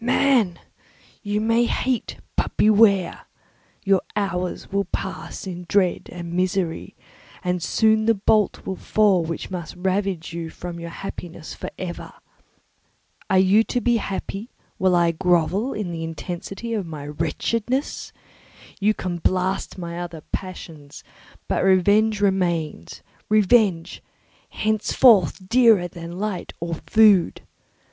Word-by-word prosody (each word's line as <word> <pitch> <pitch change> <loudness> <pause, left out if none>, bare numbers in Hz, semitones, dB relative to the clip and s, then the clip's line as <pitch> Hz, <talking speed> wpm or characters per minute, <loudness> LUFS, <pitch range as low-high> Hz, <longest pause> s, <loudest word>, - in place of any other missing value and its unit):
Man! 240 -7 +3 0.6
You 205 0 -1
may 230 +2 +2
hate, 250 0 -1 0.2
but - - -2
beware! 205 -4 +4 0.6
Your 195 -1 +3
hours 180 -3 -2
will 200 0 0
pass 195 +1 -5
in 180 -2 -7
dread 195 -3 +1
and 170 -1 -7
misery, 180 -2 -1 0.5
and 180 -1 -1
soon 220 +4 +2
the 230 0 +4
bolt 210 +1 +1
will 190 - -3
fall 205 -4 +3
which 165 +3 -5
must 175 -3 -6
ravish 185 -2 -2 0.2
from 175 -1 -7
you - - -9
your - - -6
happiness 170 -2 -8
for - - -6
ever. 175 -2 -6 1.2
Are 190 - +3
you 190 +4 +5
to 245 - -1
be 240 -1 +2
happy 200 +2 -5 0.3
while 185 -1 +3
I 170 -1 +3
grovel 180 - +1
in 205 -5 -4
the 165 -1 -4
intensity 180 +7 -6
of 205 -6 -2
my 150 -3 -7
wretchedness? 230 - -2 0.7
You 210 +1 +2
can 175 -2 -4
blast 185 +3 -1
my 170 -1 -5
other 170 -2 -6
passions, 160 -6 -7 0.4
but - - 0
revenge 205 +3 +3
remains—revenge, 190 - 0 0.5
henceforth 210 - +3
dearer 225 -6 +5
than 170 0 -9
light 205 -2 -4
or 170 0 -3
food! 210 -5 +4
190 Hz, 125 wpm, -23 LUFS, 175-215 Hz, 1.2 s, you